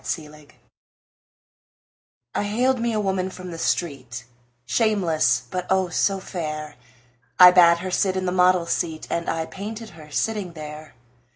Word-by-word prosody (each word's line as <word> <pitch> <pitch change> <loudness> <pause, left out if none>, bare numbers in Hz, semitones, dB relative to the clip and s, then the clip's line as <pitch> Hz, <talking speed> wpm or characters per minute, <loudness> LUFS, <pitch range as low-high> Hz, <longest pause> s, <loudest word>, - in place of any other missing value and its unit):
My 160 - -11
Madonna 150 -1 -16 1.9
I - - 0
haled 245 +5 +1
me 235 0 0
a 215 - -1
woman 190 -2 -1
from 185 -1 -9
the 165 - -7
street, 130 -9 -2 0.4
Shameless, 195 - +1
but, 180 -1 -3
oh, 190 -1 +2
so 195 +3 +1
fair! 155 -5 -5 0.6
I 180 0 +11
bade 170 -2 +6
her 185 - -4
sit 190 0 +1
in 185 - -2
the 180 - 0
model's 180 -1 +3
seat 160 -1 -2
And 170 0 -2
I 165 0 -1
painted 215 +4 -7
her 155 -3 -14
sitting 205 +2 -2
there. 155 -1 -9
180 Hz, 155 wpm, -23 LUFS, 160-195 Hz, 1.9 s, I